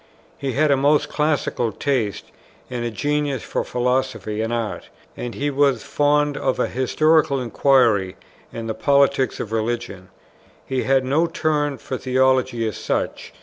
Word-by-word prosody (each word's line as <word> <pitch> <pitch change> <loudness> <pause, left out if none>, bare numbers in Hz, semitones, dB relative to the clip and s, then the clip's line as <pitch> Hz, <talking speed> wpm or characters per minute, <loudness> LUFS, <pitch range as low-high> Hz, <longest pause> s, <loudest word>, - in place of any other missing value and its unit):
He 135 -2 -3
had 150 +2 +2
a - - +5
most 145 +2 +2
classical 150 -6 0
taste, 120 -4 -2 0.4
and 120 -1 -3
a 120 - -1
genius 145 +2 -1
for - - -2
philosophy 125 -4 -1
and 110 +1 -2
art; 115 -3 -3 0.3
and 120 -1 -6
he 145 +1 -1
was 140 0 +2
fond 145 0 +1
of 130 - 0
historical 155 +3 +2
inquiry, 115 -5 +2 0.4
and 115 -1 -6
the 110 - -2
politics 140 0 +2
of 110 - -5
religion. 110 -4 -3 0.6
He 130 -1 -1
had 135 0 +2
no 155 +6 +2
turn 150 -4 -1
for 130 - -5
theology 130 -3 +1
as 110 - -4
such. - - -3
130 Hz, 145 wpm, -21 LUFS, 120-145 Hz, 0.6 s, a